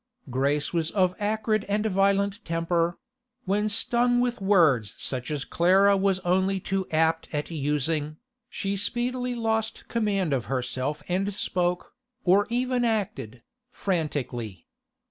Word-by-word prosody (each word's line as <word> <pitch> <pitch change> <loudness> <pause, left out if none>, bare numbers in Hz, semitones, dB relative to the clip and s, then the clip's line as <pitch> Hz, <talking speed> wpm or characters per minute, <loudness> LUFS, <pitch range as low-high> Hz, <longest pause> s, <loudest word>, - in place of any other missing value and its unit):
Grace 140 +4 0
was 165 -2 0
of 185 -2 +2
acrid 215 0 0
and 210 +1 0
violent 200 +1 +1
temper; 170 +1 0 0.5
when 205 +3 +1
stung 240 +3 +3
with 245 -3 -1
words 160 - +3
such 125 -2 -4
as 145 -3 -3
Clara 195 +4 +4
was 195 -1 +2
only 190 +2 +1
too 190 0 -2
apt 160 +1 +1
at 150 +2 -3
using, 150 0 -1 0.3
she 195 0 -2
speedily 245 +4 -1
lost 225 -1 -2
command 200 -8 0
of 125 -5 -1
herself 130 +4 -3
and 190 +3 0
spoke, 180 -2 -1 0.3
or 195 +3 +4
even 250 +1 0
acted, 135 - -2 0.3
frantically. 130 - -3
185 Hz, 125 wpm, -26 LUFS, 150-210 Hz, 0.5 s, Clara